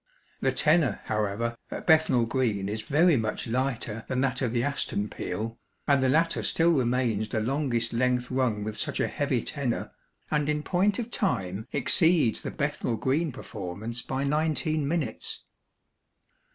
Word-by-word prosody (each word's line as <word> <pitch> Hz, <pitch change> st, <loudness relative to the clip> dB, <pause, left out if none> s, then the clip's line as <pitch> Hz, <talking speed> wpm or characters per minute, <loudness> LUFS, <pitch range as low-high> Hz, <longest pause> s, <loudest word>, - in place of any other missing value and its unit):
The -, -, +1 dB
tenor, 155 Hz, -2 st, +3 dB
however, 110 Hz, +2 st, -1 dB
at -, -, -6 dB
Bethnal 155 Hz, -7 st, +4 dB
Green 115 Hz, -6 st, 0 dB
is 105 Hz, +2 st, -3 dB
very 160 Hz, +6 st, +4 dB
much 110 Hz, -2 st, -2 dB
lighter 120 Hz, -2 st, -2 dB
than 130 Hz, 0 st, 0 dB
that 135 Hz, -1 st, 0 dB
of 125 Hz, -4 st, 0 dB
the 120 Hz, 0 st, 0 dB
Aston 125 Hz, -7 st, -1 dB
peal, 115 Hz, +2 st, -5 dB, 0.3 s
and 140 Hz, -2 st, +4 dB
the 130 Hz, -, +3 dB
latter 165 Hz, +4 st, +2 dB
still 165 Hz, +1 st, +2 dB
remains 120 Hz, -6 st, +1 dB
the 110 Hz, -, -1 dB
longest 120 Hz, -1 st, -1 dB
length 125 Hz, +1 st, +1 dB
rung 125 Hz, -5 st, 0 dB
with 110 Hz, 0 st, -5 dB
such -, -, -2 dB
a -, -, +2 dB
heavy -, -, -1 dB
tenor, -, -, -2 dB, 0.4 s
and 150 Hz, -1 st, +1 dB
in 150 Hz, 0 st, 0 dB
point 195 Hz, +4 st, +2 dB
of 240 Hz, 0 st, -4 dB
time 100 Hz, -, -1 dB
exceeds 155 Hz, -1 st, +4 dB
the -, -, -4 dB
Bethnal 115 Hz, -, -2 dB
Green 150 Hz, +6 st, 0 dB
performance 110 Hz, -1 st, -6 dB
by 135 Hz, +2 st, -3 dB
nineteen 150 Hz, 0 st, 0 dB
minutes. 145 Hz, -8 st, -2 dB
130 Hz, 155 wpm, -27 LUFS, 115-150 Hz, 0.4 s, Bethnal